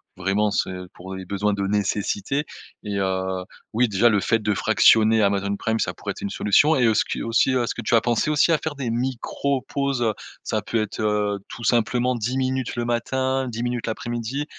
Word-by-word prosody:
vraiment 95 +3 0
c'est 100 - 0 0.2
pour 95 +1 -8
les 95 0 -7
besoins 100 +2 0
de 100 0 -2
nécessité 105 +6 -1 0.4
et 105 -2 -3
heu, 95 -1 -1 0.3
oui 120 +3 +3
déjà 105 +4 +4
le 105 -2 +3
fait 115 - +2
de 105 -1 -1
fractionner 110 +1 +4
Amazon 100 0 +1
Prime 110 +1 -1
ça - - -1
pourrait - - -5
être - - -9
une 100 - -3
solution. 145 +12 +3
Et 125 - +3
heu, 110 - +4
ce 105 - +3
qui - - -4
heu, - - -4
aussi 115 +3 +2
est-ce 125 -2 0
que - - -6
tu 115 - +1
as 115 - +5
pensé 120 +5 +1
aussi 150 +2 +3
à 160 - +3
faire 155 -2 -4
des 130 -4 -3
micros-pauses? 130 +2 -1
Heu 110 -2 +1 0.3
ça - - -1
peut 115 - -1
être 110 - -5
heu 105 -1 0
tout 120 - -9
simplement 120 +2 +2
10 120 +3 -2
minutes, 130 -1 -1
le 120 0 -2
matin 130 +3 0
10 115 0 -4
minutes, 120 -1 -2
l'après-midi 120 +5 -3
115 Hz, 215 wpm, -23 LUFS, 105-125 Hz, 0.4 s, as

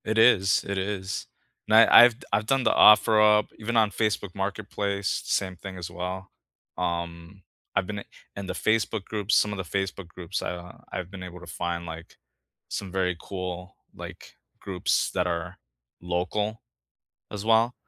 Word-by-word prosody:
It 110 +1 -1
is. 95 -5 +5
It 100 0 -2
is. 95 0 -3 0.4
And 110 - +3
I 115 +1 +9
I've 120 0 +1
d - - -14
I've 105 +1 +2
done 135 0 +2
the - - +4
OfferUp, 105 0 +6
even 115 +2 -2
on 110 -2 +4
Facebook 100 -2 -1
marketplace, 100 0 -2
same 95 -1 -1
thing 95 +1 -9
as 85 -1 -6
well. 90 +2 -5 0.5
Um, 85 +1 -4 0.3
I've 95 - +2
been 105 -1 -4
i - - -8 0.3
in 100 -1 -6
the 90 - -3
Facebook 110 0 0
groups, 105 -1 0
some 105 - +3
of - - -5
the 95 - -3 0.2
Facebook 95 -1 -5
groups, 90 +1 -5
I, - - -2
uh, 90 0 -9
I've 90 0 -5
been 95 -2 -8
able 90 0 -9
to 90 - -12
find, 85 +1 -3
like, 80 0 -9 0.5
some 95 -2 -5
very 90 -1 0
cool, 90 0 -6 0.2
like, - - -10 0.3
groups 95 -3 0
that 90 -1 0
are 85 +1 -3 0.4
local 95 +5 -2 0.7
as 105 0 -5
well. 115 +2 +3
95 Hz, 170 wpm, -26 LUFS, 90-105 Hz, 0.7 s, I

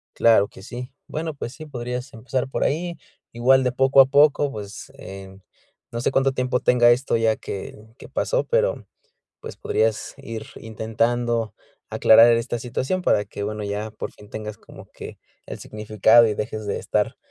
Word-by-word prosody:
Claro 110 -3 +4
que 95 - -15
sí. 125 +5 -8 0.2
Bueno, 160 +1 -4
pues 130 -4 -7
sí, 155 +3 -10
podrías 125 -1 -6
empezar 125 +3 -3
por 135 - -2
ahí. 170 +3 -1 0.3
Igual, 130 +3 +3
de 125 - +1
poco 135 +2 +3
a 135 - +10
poco, 145 +1 +3
pues, 105 +3 -8
em, 95 -5 -11 0.5
no 115 - -4
sé - - +1
cuánto 135 0 +2
tiempo 125 -1 0
tenga 120 -1 +5
esto 125 0 +1
ya 115 -1 +2
que 100 - -7 0.2
que - - -13
pasó, - - 0
pero, - - +1
mm, - - -14 0.6
pues, - - -9
podrías 435 +3 -1
ir 115 -1 -7
intentando 115 +1 -1 0.4
aclarar 115 +2 +6
esta 115 +1 -1
situación, 130 +9 -2
para 105 - +2
que, 100 - -7
bueno, 105 +1 -4
ya 105 +2 -3
por - - -6
fin 105 - -17
tengas 105 -1 -7
como - - -14
que, - - -10 0.3
el - - -7
significado, 110 +2 +3
y 105 - -1
dejes 110 0 -4
de - - -1
estar, - - -1
120 Hz, 175 wpm, -23 LUFS, 110-135 Hz, 0.6 s, a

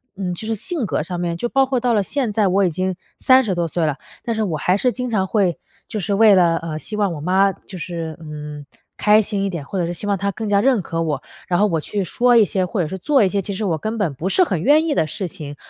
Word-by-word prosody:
嗯， 185 -2 -3
就 215 +5 -6
是 225 - 0
性 335 - -2
格 - - -1
上 175 +2 -4
面 170 -1 -2
就 240 - -2
包 270 +2 +2
括 260 -2 0
到 240 -1 +1
了 210 - +3
现 245 +2 -2
在 210 -1 +2
我 195 +1 +3
已 175 - +1
经 185 +3 -2 0.2
30 255 -6 +4
多 175 -1 -1
岁 165 0 -1
了， 150 -2 -1 0.3
但 230 - -2
是 220 - -1
我 175 -7 -1
还 180 +5 +1
是 250 +4 +2
经 250 +1 -4
常 190 -3 +1
会 190 -5 +1 0.3
就 215 - -4
是 200 +2 -1
为 215 0 +6
了， 175 -3 +4
呃， 160 -2 -5
希 215 - -6
望 205 -4 0
我 150 - -7
妈 190 +4 +3
就 190 0 -12
是 165 -2 -5
嗯， 150 -2 -8 0.3
开 210 +1 +5
心 200 -1 -1
一 195 - 0
点， 170 -5 -5
或 190 - -5
者 175 - +1
是 175 - -3
希 205 - -6
望 200 -1 +1
她 200 +1 -1
更 215 +1 -5
加 200 - +4
认 245 -1 +3
可 165 -1 -3
我。 150 -4 -2 0.3
然 175 - +1
后 210 - +4
我 165 -4 0
去 200 +6 -3
说 245 +7 +2
一 225 - +7
些， 190 -2 0
或 185 +1 -2
者 155 - -1
是 190 - -5
做 270 - +3
一 190 - +3
些， 200 +1 0
其 200 +2 -5
实 205 +3 -4
我 175 -6 0
根 215 +8 -4
本 190 -9 0
不 165 +8 -3
是 370 - +4
很 180 - -1
愿 300 - +4
意 315 - +1
的 160 - +2
事 185 +5 -4
情。 150 -5 -8
195 Hz, 310 characters per minute, -20 LUFS, 170-215 Hz, 0.3 s, 一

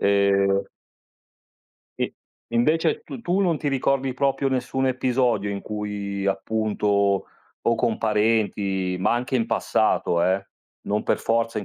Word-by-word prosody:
E 100 -1 +3 1.3
Sì, - - +2
e - - -7 0.4
invece 160 - +2
tu 230 - -8
tu 185 +1 +1
non 175 -5 +2
ti 150 - -2
ricordi 135 -1 +1
proprio 135 +1 +1
nessun 130 0 -1
episodio 125 -5 +1
in 100 -1 -4
cui 100 -2 -4
appunto, 100 -1 +1 0.4
o 115 - +3
con 115 -1 0
parenti, 105 -4 +1
ma 100 - +2
anche 125 +2 -2
in 115 -3 +2
passato, 85 0 +1
eh, 95 +1 +1 0.4
non 105 +1 -1
per - - +1
forza 115 -1 0
in 105 - -5
110 Hz, 140 wpm, -24 LUFS, 100-130 Hz, 1.3 s, E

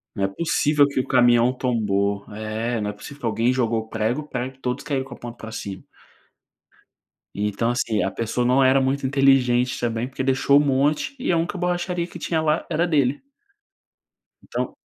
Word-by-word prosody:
Não 100 - 0
é - - +1
possível 150 +3 +2
que 140 - -3
o 130 - 0
caminhão 120 -1 +4
tombou, 100 -5 0
é, 110 +2 -3
não 105 0 -2
é - - -5
possível 140 +7 -11
que 120 - -4
alguém 115 +3 +1
jogou 115 -3 -1
prego, 115 +8 -2
prego 130 +1 -4
todos 125 +1 -3
caíram 140 -3 -2
com 130 -2 -10
a - - -12
ponta 120 -1 -9
para 110 -1 -9
cima. 100 -4 -6 1.5
E 105 +1 -1
então, 115 +4 -1
assim, 115 -3 0
a 95 - 0
pessoa 115 +3 -2
não 130 +2 +3
era 130 +1 +5
muito 135 +1 0
inteligente, 130 -2 +3
também, 120 +1 -2
porque 130 0 -4
deixou 135 +1 +4
um - - +1
monte 145 - +1
e 255 - -2
a 170 - +3
única 170 +4 -1
borracharia 175 -1 -1
que 175 - -10
tinha 160 -1 -1
lá 155 +1 0
era 170 +3 0
dele. 145 - +1 1.2
Então - - -4
125 Hz, 190 wpm, -23 LUFS, 115-140 Hz, 1.5 s, era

